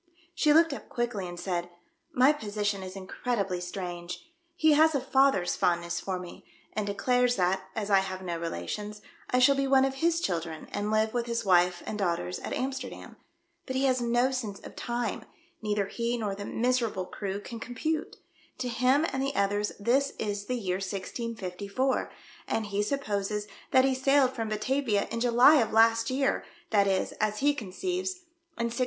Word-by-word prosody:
She 325 -3 +3
looked 325 0 +5
up - - -9
quickly, 240 -6 -2
and 175 0 -7
said, 175 -2 -2 0.4
"My 280 -1 +5
position 205 -6 -2
is 185 0 -7
incredibly 195 -1 -2
strange. 175 -1 -6 0.3
He 315 -2 +4
has 315 +1 +5
a - - +3
father's 265 -8 +3
fondness 170 0 0
for 190 -1 -3
me, 180 -1 -9 0.3
and 210 0 -2
declares 245 +4 +2
that, 190 0 0
as 210 -1 -2
I 195 - +7
have 190 -1 -4
no 170 -2 -3
relations, 210 +5 -5 0.3
I 250 - +2
shall 255 +2 +6
be 275 0 0
one 270 0 +5
of 270 - -1
his 335 0 +3
children, 165 - -3
and 205 +1 -1
live 220 0 +2
with 240 -1 -1
his 235 -1 -2
wife 180 -1 +3
and 215 - -4
daughters 170 - -1
at - - -6
AmiSterdam. 265 +1 -4 0.5
But 260 - -3
he 265 - +1
has 255 -2 +2
no 240 +2 +2
sense 220 -7 -4
of - - -11
time. 240 -3 -3 0.4
Neither 210 -2 0
he 235 +4 -2
nor 210 -4 -2
the 200 +1 -6
miserable 235 -6 0
crew 195 +1 -4
can 230 +2 -8
com 245 +2 -7
pute. 310 +5 -2 0.4
To 250 -1 -3
him 255 +5 +3
and 265 - -1
the 275 +1 -1
others 205 +1 +1
this 265 +6 +2
is 205 -1 -3
the 250 - -1
year 185 -5 -1
1654, 200 +4 -3 0.4
and 220 - -1
he 205 0 -1
supposes 210 -4 -2 0.2
that 260 0 +5
he 270 - +3
sailed 265 0 +3
from 225 -3 -3
Batavia 215 0 0
in 230 - -2
July 245 +5 +6
of 225 -5 +2
last 225 +1 +4
year, 270 +1 +1 0.3
that 200 -2 +4
is, 190 -1 +1
as 215 0 +1
he 290 +1 +4
conceives, 360 - -3 0.4
in 235 - 0
1653. 240 - -5
220 Hz, 185 wpm, -29 LUFS, 195-260 Hz, 0.5 s, I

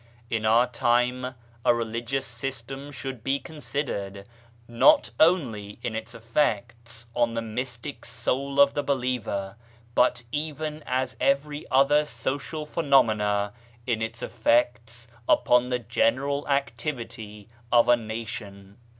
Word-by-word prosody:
In 110 -1 0
our 115 +3 +5
time 125 +1 +1 0.3
a 120 - +5
religious 120 +3 -2
system 135 +3 -6
should 130 -3 -6
be 135 +2 +1
con 160 +2 -11
sidered, 100 -10 -4 0.4
not 280 - +5
only 120 - +2
in 110 - -2
its 110 +1 -5
effects 115 0 -2
on 115 -1 +1
the 115 - 0
mystic 125 +4 -5
soul 135 +3 -2
of 140 0 +7
the 145 - 0
believer, 125 -7 -2 0.4
but 125 0 +3
even 155 0 -3
as 130 +1 -1
every 145 +2 0
other 140 +3 +5
social 140 +5 -4
phenomena 110 -10 +2 0.2
— 120 0 -28
in 115 -3 0
its 115 +2 -4
effects 115 0 0 0.2
upon 125 0 +4
the 125 - +1
general 130 +4 0
activity 115 -6 -3 0.2
of 120 -1 +5
a 120 - +7
nation. 110 -3 -7
120 Hz, 125 wpm, -26 LUFS, 115-140 Hz, 0.4 s, of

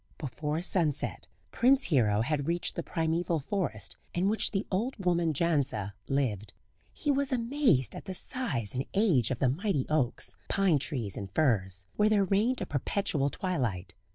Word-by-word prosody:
Before 150 +3 -3
sunset 160 -7 +1 0.2
Prince 265 +3 +4
Hero 110 - +3
had 145 +3 -1
reached 170 +1 -1
the - - -2
primeval 165 +1 -1
forest 130 - -3 0.2
in 185 +3 +2
which 220 - +2
the 195 -1 -2
old 225 +8 -1
woman 175 -4 +1
Jandza 140 - 0
lived. 110 -8 -1 0.4
He 295 - -1
was 280 0 +1
amazed 240 - +2
at - - -8
the 190 - -5
size 165 - -3
and 130 +2 -3
age 175 - +3
of 130 - -1
the 130 - +2
mighty 155 - 0
oaks, 145 -6 0
pine 190 -7 +3
trees 120 - -2
and 100 -1 -5
firs, 95 - +1
where 210 +1 +4
there 210 -2 +4
reigned 215 +7 +1
a - - -1
perpetual 145 - -1
twilight. 120 - -2
155 Hz, 160 wpm, -29 LUFS, 125-195 Hz, 0.4 s, Prince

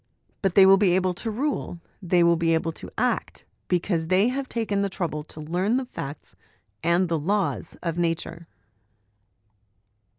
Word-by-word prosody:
But 195 -3 0
they 195 - +8
will 195 0 +7
be 190 -3 +3
able 185 -1 +1
to 225 +6 -4
rule, 240 - -2 0.2
they 175 -1 +3
will 170 0 +5
be 165 0 +2
able 165 0 -1
to - - -10
act, - - -1 0.2
because 175 -2 0
they 190 +6 +3
have 265 +1 -3
taken 210 -4 -1
the 200 - 0
trouble 170 -5 -3
to 155 - -10
learn 180 +9 0
the 260 - -2
facts 145 - -7 0.5
and 170 +3 +2
the 165 -1 0
laws 195 +1 -1
of 170 -1 -2
Nature." 165 0 -2
180 Hz, 165 wpm, -25 LUFS, 165-200 Hz, 0.5 s, they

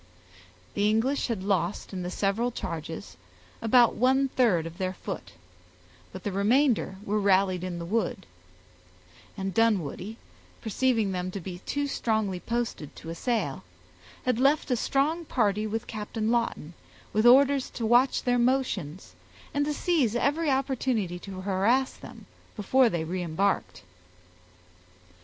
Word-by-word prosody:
The 205 +1 +2
English 240 +6 +1
had 225 -6 -3
lost 195 -1 -1
in 185 - -4
the 180 - -3
several 200 +6 0
charges 155 - -6 0.4
about 235 +1 +5
one 265 +3 +2
third 220 -12 +2
of 165 +3 -9
their 185 -1 -1
foot, 180 - -7 0.8
but 185 -1 -9
the 205 - -2
remainder 220 +2 +2
were 210 +1 0
rallied 190 -2 +2
in 180 -2 -4
the 170 - -5
wood; 200 -1 -1 1.1
and 190 -1 -3
Dunwoodie, 215 -1 0 0.4
perceiving 225 -2 +1
them 180 0 -2
to 195 - -5
be 180 0 -7
too 285 0 -1
strongly 220 -8 -1
posted 230 -10 -3
to 165 - -8
assail, 230 +7 -2 0.6
had 250 -2 +1
left 280 +2 +2
a - - +4
strong 285 +8 0
party 215 -7 0
with 225 +2 -3
Captain 215 +1 -3
Lawton, 230 -9 -1 0.4
with 215 +3 +4
orders 275 +1 +5
to 230 - -4
watch 245 +4 +3
their 245 -1 +2
motions, 235 - -1 0.4
and 285 0 +1
to 300 - -1
seize 290 -9 +1
every 290 +6 +1
opportunity 255 -9 0
to 190 0 -8
harass 205 +8 +1
them - - -12 0.3
before 245 +4 +3
they 170 -5 -2
reëmbarked. 180 +3 -1
215 Hz, 140 wpm, -27 LUFS, 185-250 Hz, 1.1 s, about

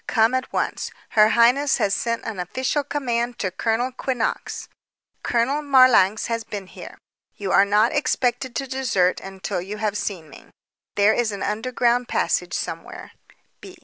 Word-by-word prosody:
Come 225 +1 +3
at 260 0 -2
once. - - -2 0.2
Her 215 0 +5
highness 250 +5 +4
has 200 - +1
sent 230 -1 -2
an 215 -4 -5
official 260 - -1
command 245 -4 -2
to 185 - -2
Colonel 225 +6 -1
Quinnox. 255 -2 -3 0.5
Count 270 +5 0
Marlanx 255 -7 +5
has 230 -1 -2
been 205 -3 -7
here. - - -11 0.4
You 195 -2 -4
are 195 - +5
not 210 +3 +3
expected 250 -3 0
to 270 - -2
desert 230 -9 +1
until 195 -1 -5
you 200 +4 -6
have 210 -1 -2
seen 185 -6 -4
me. 150 - -15 0.5
There 205 +1 +4
is 235 -3 0
an 200 -1 -5
underground 240 +2 0
passage - - -1
somewhere. - - -6
230 Hz, 150 wpm, -22 LUFS, 205-255 Hz, 0.5 s, Her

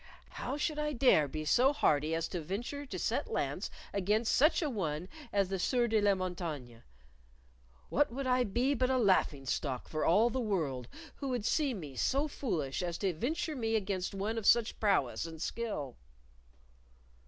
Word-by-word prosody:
How 265 +4 -4
should 300 0 -1
I 300 0 -1
dare 240 - +4
be 155 +2 -5
so 255 - +4
hardy 155 - +2
as 165 0 -1
to 175 - -3
venture 240 - -4
to - - -5
set - - -1
lance - - -2 0.2
against 210 +4 +1
such 310 +5 +4
an 290 -4 -1
one 165 -4 -2 0.2
as 200 -2 +1
the 195 -1 -2
Sieur 245 +5 +2
de 220 -2 +2
la 205 -1 +4
Montaigne? 170 -10 -4 1.1
What 290 -1 +2
would 270 +3 -4
I 250 0 +3
be 245 +6 +1
but 255 -1 +1
a 260 - +2
laughing 185 - +2
stock 130 0 -2
for 155 -1 -2
all 215 +8 +4
the 260 - -1
world 155 - -1 0.3
who 275 - -4
would 245 -5 -2
see 285 -3 +1
me 150 -9 -8
so 275 - +1
foolish 165 - -2
as 175 -2 -2
to 195 -3 0
venture 310 - -2
me 225 -3 0
against 195 -3 -2
one 215 +4 -1
of 210 - -2
such 235 -2 +4
prowess 180 - +1
and 160 -1 -9
skill?" 155 - -4
205 Hz, 180 wpm, -32 LUFS, 165-255 Hz, 1.1 s, dare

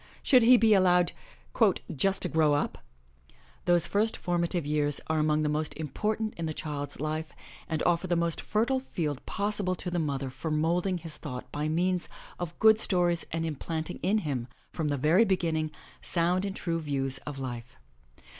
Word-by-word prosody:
Should 255 -3 +6
he 245 +2 +7
be 225 -2 +5
allowed 180 -3 +4 0.8
'*just 195 +7 0
to - - 0
grow 155 -3 +3
up* 145 - -2 0.5
7 65 - -27 0.3
Those 175 -2 +5
first 215 +2 +1
formative 175 -2 -1
years 145 -1 +2
are 160 0 0
among 155 0 +2
the - - +1
most 150 +1 -2
important 215 +9 -2
in 165 -1 -3
the 155 - -4
child's 145 -2 -5
life 155 +1 -3 0.4
and 160 -1 -1
offer 175 +1 +1
the 175 - +1
most 170 -1 -1
fertile 235 +5 +1
field 155 - -4
possible 200 -2 0
to 180 0 -5
the 175 - 0
mother 140 -4 -2
for 135 +5 -5
moulding 170 +4 +1
his 165 -2 -5
thought 125 -4 -7
by 150 +1 -2
means 180 +2 0 0.3
of 175 -1 -5
good 220 0 +6
stories 175 -4 +1
and 165 0 -1
implanting 160 +1 -4
in 195 +5 +2
him, 130 -5 -2 0.2
from 160 -3 -2
the 145 -1 0
very 160 - +4
beginning, 165 -6 0 0.3
sound 180 +2 +1
and 195 -1 -4
true 165 -1 -2
views 135 -3 -1
of 145 -2 -5
life. 120 -3 -6
165 Hz, 180 wpm, -28 LUFS, 150-185 Hz, 0.8 s, he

